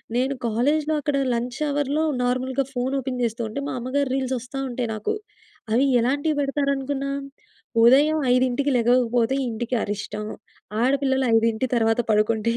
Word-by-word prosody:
నేను 260 +2 +1
కాలేజ్‌లో 290 +7 +1
అక్కడ 285 0 0 0.2
లంచ్ 240 +1 -3
హవర్‌లో 290 +1 0 0.2
నార్మల్‌గా 255 +2 0
ఫోన్ 250 +2 -1
ఓపెన్ 255 -1 -4
జేస్తుంటే, 230 +1 -2
మా - - -3
అమ్మగారి 260 +3 -1
రీల్స్ 265 -1 -1
ఒస్తా 260 +3 -7
ఉంటాయి 240 -1 -3
నాకు. 320 - -2 0.6
అవి 245 +5 +3
ఎలాంటివి 285 +5 0
బెడతారనుకున్నాం? 275 0 -1 0.6
ఉదయం 285 +6 +6 0.2
5కి 255 +3 +1
లెగకపోతే 240 +1 +2
ఇంటికి 235 +2 -3
అరిష్టం. 210 +1 -4 0.6
ఆడపిల్లలు 265 0 +2
5 225 +2 +2
తర్వాత 225 0 +2
పడుకుంటే, 215 +2 +2
255 Hz, 130 wpm, -23 LUFS, 235-275 Hz, 0.6 s, ఉదయం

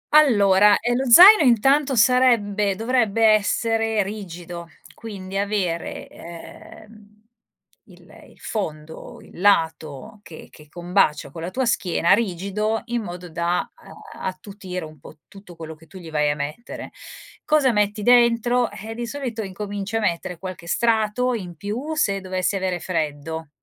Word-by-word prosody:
Allora, 205 -8 +5
eh 240 0 -1
lo 260 +1 -1
zaino 370 - +10
intanto 270 +2 +3
sarebbe 210 -4 +3
dovrebbe 225 -1 +1
essere 225 +1 +1
rigido, 175 -4 -8 0.2
quindi 195 -3 -7
avere, 195 -5 -3
ehm, 210 +5 -14 0.6
il - - -19 0.2
il - - -22
fondo, 160 -7 -6
il - - -15
lato 160 -3 0
che 165 -5 -13
che 150 -1 -17
combacia 175 -4 0
con 165 - -9
la 170 - -4
tua 260 +6 -2
schiena, 180 -7 +1
rigido, 210 +1 -1
in 240 -1 -3
modo 180 -3 -8
da, 170 +1 -2 0.2
ehm, - - -14
attutire 185 -2 -6
un 155 -2 -14
po' 155 - -14
tutto 195 -3 -15
quello 160 -1 -8
che 160 +1 -19
tu 190 - -13
gli 165 -3 -11
vai 150 -1 +1
a 145 - 0
mettere. 150 +11 -7 0.5
Cosa 300 -4 +3
metti 210 -1 0
dentro? 240 0 +3
Eh, 215 +2 -8
di 240 +1 -5
solito 240 -3 -5
incominci 205 +1 -6
a 225 - +2
mettere 180 -3 -2
qualche 185 -2 -8
strato 230 +4 +1
in 180 -7 -6
più 235 - -5
se 200 -10 0
dovessi 185 +1 -2
avere 185 -2 -2
freddo. 160 -2 -4
200 Hz, 145 wpm, -22 LUFS, 175-225 Hz, 0.6 s, zaino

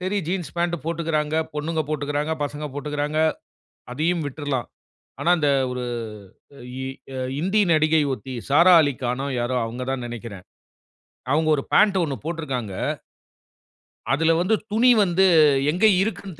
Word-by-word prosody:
சரி 190 +3 -1
jeans 175 -4 -3
pant 170 0 0
போட்டுக்கிறாங்க. 155 -2 -1 0.2
பொண்ணுங்க 155 +2 -2
போட்டுக்கிறாங்க. 150 +1 -2
பசங்க 145 +1 -5
போட்டுக்கிறாங்க. 150 +1 -3 0.7
அதையும் 160 +4 0
விட்டுறலாம். 145 -3 -3 0.5
ஆனா 170 - +1
அந்த 145 -2 +2 0.2
ஒரு 125 0 -4 1.0
இ - - -4 0.3
அ 130 - -4 0.2
இந்தி 195 +5 +1
நடிகை 155 0 +3
ஒருத்தி, 130 0 -6 0.2
"சாரா 170 +6 +6
அலிகானோ" 130 -1 -2
யாரோ 120 +1 -1
அவங்க 120 +3 -6
தான் 130 -2 -4
நெனைக்கிறேன். 115 -5 -8 0.9
அவங்க 155 +1 +2
ஒரு 140 - -3
பேண்ட் 200 -3 +4
ஒண்ணு 140 -4 -3
போட்டிருக்காங்க. 135 - -4 1.4
அதில 160 +3 +3
வந்து 200 +5 +2 0.2
துணி 240 +4 +5
வந்து 190 0 +2 0.5
எங்க 185 +6 +2 0.2
இருக்குன்னு 195 -6 -4
155 Hz, 130 wpm, -23 LUFS, 135-170 Hz, 1.4 s, சாரா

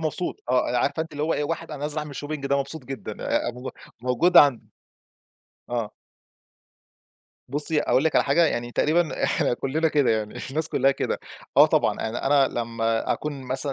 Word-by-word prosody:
مبسوط، 165 +3 -3
آه 125 - +2
أنا 125 - +1
عارفة 145 +6 0
أنتِ 160 - -11
اللي 145 0 -4
هو 160 +2 +1
إيه، 150 - -1
واحد 165 +2 -4
أنا 150 -2 -7
نازل 150 +1 -2
أعمل 150 -1 -5
shopping 145 -1 -4
ده 140 0 +2
مبسوط 140 +1 -5
جدًا 135 +2 -6
آآ - - 0
مو 125 +2 -7 0.3
موجود 130 +9 +2
عند 125 -8 +6 1.0
آه. 115 -3 -2 1.6
بُصّي، 150 +3 0
أقول 135 - +2
لِك 160 - +2
على - - +4
حاجة، 165 +5 +4
يعني 120 -4 -2
تقريبًا 160 +4 +1
إحنا - - +1
كلنّا 155 +6 0
كده، 145 -4 +2
يعني 110 -1 -2
الناس 155 +3 -1
كلها 135 +1 +3
كده 135 - -2 0.4
آه - - +9
طبعًا، - - +1
يعني 110 - -3
أنا 140 -1 +3
لمّا 115 -1 -1
أكون 145 -2 -4
مثلًا 130 +2 -2
140 Hz, 185 wpm, -24 LUFS, 125-155 Hz, 1.6 s, آه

